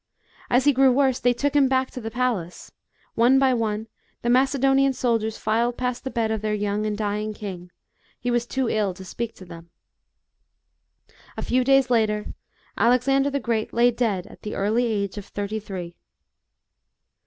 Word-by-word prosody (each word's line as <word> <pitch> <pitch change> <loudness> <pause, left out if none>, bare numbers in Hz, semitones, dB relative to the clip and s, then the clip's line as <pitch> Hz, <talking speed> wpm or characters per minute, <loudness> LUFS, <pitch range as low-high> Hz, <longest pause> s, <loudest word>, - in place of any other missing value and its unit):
As 250 +3 +3
he 290 - +5
grew 265 0 +5
worse 265 -1 +2
they 245 - +3
took 280 +4 -1
him 280 -2 +5
back 260 0 0
to 250 - -7
the 225 - -4
palace. 225 -8 -3 0.4
One 240 +3 +4
by 265 -1 +4
one 220 -2 -1 0.4
the 240 - +1
Macedonian 270 +1 +3
soldiers 225 -3 -1
filed 235 +3 0
past 250 -1 -2
the 265 - -3
bed 230 -3 -1
of 220 -2 -2
their 215 0 -1
young 210 +1 -1
and 210 -1 -2
dying 210 0 -2
king; 180 -4 -7 0.5
he 245 - -2
was 240 0 0
too 265 -1 -1
ill 205 -5 0
to 190 - -10
speak 230 +5 -5
to 185 - -12
them. 170 -1 -12 1.7
A - - -4
few 255 +1 +1
days 270 -1 +3
later, 215 -3 +1 0.4
Alexander 270 +4 +3
the 280 0 -1
Great 225 -3 -2
lay 240 +1 +4
dead 220 -6 -1
at - - -15
the 210 - -5
early 220 +5 +1
age 205 -2 -2
of 200 - -10
thirty 205 +2 -4
three. 180 -4 -7
230 Hz, 175 wpm, -24 LUFS, 210-255 Hz, 1.7 s, he